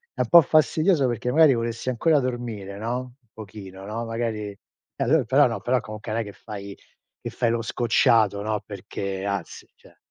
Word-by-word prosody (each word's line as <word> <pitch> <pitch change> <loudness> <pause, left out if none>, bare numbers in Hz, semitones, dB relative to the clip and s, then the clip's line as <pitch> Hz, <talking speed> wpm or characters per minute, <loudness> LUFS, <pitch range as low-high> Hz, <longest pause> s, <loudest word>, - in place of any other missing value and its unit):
è - - -8
un - - +2
po' 170 -1 +9
fastidioso 155 +1 +3
perché 120 +1 -2
magari 155 -2 +6
vorresti 115 +1 -3
ancora 145 +5 +2
dormire, 120 -6 -4
no, 115 +3 -2
un 125 -1 -14
pochino, 95 -2 -10
no, 115 +3 -4
magari 115 -2 -3
e 100 - -14 0.5
allo 140 +3 +3
però 135 +5 +4
no 115 - -3
però 125 +1 +1
comunque 110 0 -7
non 115 - 0
è - - -2
che 100 - -9
fai 100 0 -9 0.4
che - - -5
fai 115 - 0
lo 115 0 0
scocciato, 115 -3 +2
no, 105 0 -1
perché 100 -1 -5
anzi, 100 -4 -4
cioè - - -21
115 Hz, 190 wpm, -24 LUFS, 105-125 Hz, 0.5 s, po